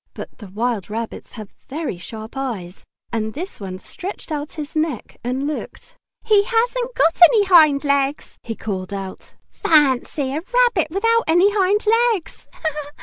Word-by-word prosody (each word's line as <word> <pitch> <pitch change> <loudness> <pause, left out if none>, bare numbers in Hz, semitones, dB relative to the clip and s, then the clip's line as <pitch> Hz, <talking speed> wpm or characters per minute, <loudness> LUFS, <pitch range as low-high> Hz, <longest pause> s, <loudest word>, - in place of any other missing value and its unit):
But - - -9
the 210 - -9
wild 215 0 -2
rabbits 225 +1 -6
have 215 -4 -10 0.2
very 290 - -4
sharp 220 +5 -9
eyes. 215 -10 -5 0.3
And 220 0 -2
this 360 +6 -6
one 190 -2 -6
stretched 360 - -7
out 295 0 -4
his 305 0 -7
neck 310 -6 -2
and 255 +3 -2
looked. 305 +10 -6 0.3
"He 425 -3 +4
hasn't 485 +2 0
got 330 +2 +2
any 425 +3 +4
hind 310 -6 +6
legs!" 280 0 0
he 225 - -5
called 195 -2 -4
out. 195 -1 -8 0.2
"Fancy 275 -2 +2
a 310 - -2
rabbit 485 -10 +3
without 455 +6 +2
any 350 +5 +5
hind 405 +1 +2 0.3
legs!" 345 -5 -10
295 Hz, 150 wpm, -21 LUFS, 225-380 Hz, 0.3 s, hind